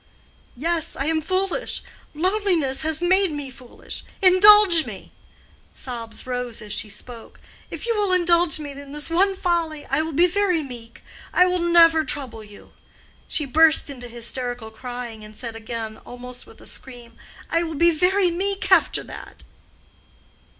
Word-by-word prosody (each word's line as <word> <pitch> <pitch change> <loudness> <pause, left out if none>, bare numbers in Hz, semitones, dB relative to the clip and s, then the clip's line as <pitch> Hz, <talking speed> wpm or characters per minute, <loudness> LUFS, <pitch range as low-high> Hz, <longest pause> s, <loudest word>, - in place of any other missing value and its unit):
"Yes, 330 +3 -1
I 275 - -3
am 320 0 0
foolish—loneliness 370 - -1
has 315 +1 -1
made 375 0 +3
me 290 -3 -6
foolish—indulge 370 - +4
me." - - -10 0.6
Sobs 230 -3 -6
rose 250 -2 -4
as 210 -1 -8
she 215 - -4
spoke. 230 +3 -9 0.3
"If - - -7
you 465 -1 0
will 410 -2 0
indulge 345 -2 +3
me 295 -2 -6
in 280 0 -11
this 295 +2 -4
one 385 +3 +2
folly 335 -5 -2
I 275 +3 0
will 320 +1 -4
be 340 +5 +4
very 360 -3 +1
meek—I 245 +7 -3
will 365 0 0
never 335 -2 +5
trouble 255 -8 -3
you." 205 -1 -16 0.5
She 300 - 0
burst 310 +2 +4
into 245 -3 -9
hysterical 240 -1 -5
crying, 240 -1 -8
and 215 0 -12
said 230 0 -6
again 225 -1 -6
almost 250 0 -8
with - - -17
a - - -14
scream—"I 245 +6 -6
will 325 -2 -4
be 340 +4 +4
very 360 +3 +2
meek 385 +2 -3
after 365 -3 +3
that." - - -11
310 Hz, 145 wpm, -22 LUFS, 245-355 Hz, 0.6 s, never